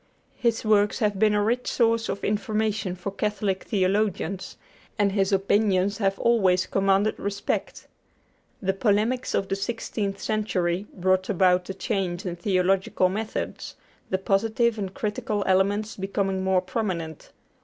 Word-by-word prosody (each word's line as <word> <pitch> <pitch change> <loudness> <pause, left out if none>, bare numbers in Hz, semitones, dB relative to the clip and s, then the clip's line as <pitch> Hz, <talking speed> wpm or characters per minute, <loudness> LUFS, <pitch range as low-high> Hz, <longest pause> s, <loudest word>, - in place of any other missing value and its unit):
His 230 -2 0
works 210 -1 +3
have 210 -4 0
been 215 0 +4
a 205 - +2
rich 240 +4 0
source 230 -2 +1
of 195 - -4
information 210 -2 -1
for 185 +2 -5
Catholic 200 -1 -2
theologians, 195 -1 -1 0.4
and 205 -2 +2
his 195 0 +1
opinions 200 0 +2
have 195 -2 +1
always 190 -6 +3
commanded 195 +2 +1
respect. 200 0 -3 0.8
The 195 0 +1
polemics 215 +5 +1
of 195 - 0
the 195 - -1
sixteenth 200 -1 -3
century 195 -3 -1
brought 185 0 +1
about 180 -2 +3
a 190 - -4
change 190 -3 -2
in 175 -2 -3
theological 185 0 +1
methods, 215 +3 -4 0.3
the 190 - +1
positive 220 +4 +1
and 195 -2 -3
critical 210 0 -2
elements 200 +3 +1
becoming 195 -1 -1
more 190 -1 +2
prominent. 180 -7 -4
200 Hz, 135 wpm, -25 LUFS, 190-215 Hz, 0.8 s, been